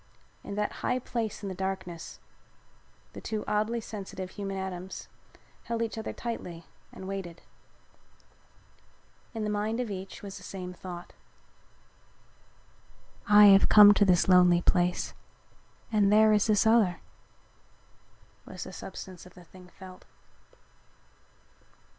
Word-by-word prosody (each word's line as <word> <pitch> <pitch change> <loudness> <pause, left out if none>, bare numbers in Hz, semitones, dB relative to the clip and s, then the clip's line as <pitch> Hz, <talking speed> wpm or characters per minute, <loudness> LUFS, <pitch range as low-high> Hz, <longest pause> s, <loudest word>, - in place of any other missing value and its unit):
In 200 - -6
that 210 0 -1
high 250 - 0
place 230 -4 -4
in - - -4
the - - -4
darkness 190 -2 -5 0.9
the - - -9
two 215 -1 -4
oddly 215 +3 0
sensitive 195 -4 -7
human 195 -2 -5
atoms 190 -1 -6 0.6
held 230 0 -2
each 225 - -4
other 220 0 -5
tightly 175 -8 -6 0.3
and 190 - -10
waited. 190 -4 -6 1.9
In 220 - -3
the 210 - -1
mind 210 +3 -2
of 240 -4 -3
each 190 +1 -8
was 200 -1 -8
the - - -13
same 180 -2 -7
thought. 175 -1 -9 2.2
"I 210 0 +8
have 195 - +5
come 205 -1 +9
to 205 - +3
this 180 -3 +3
lonely 180 -1 +5
place 180 0 +1 0.8
and 205 -2 +3
here 215 0 +6
is 210 0 +2
this 215 0 +3
other," 220 -6 +3 1.5
was - - -7
the - - -10
substance 185 -1 -9
of 180 - -19
the 180 - -14
thing 180 +1 -16
felt. 185 0 -14
195 Hz, 130 wpm, -28 LUFS, 180-215 Hz, 2.2 s, come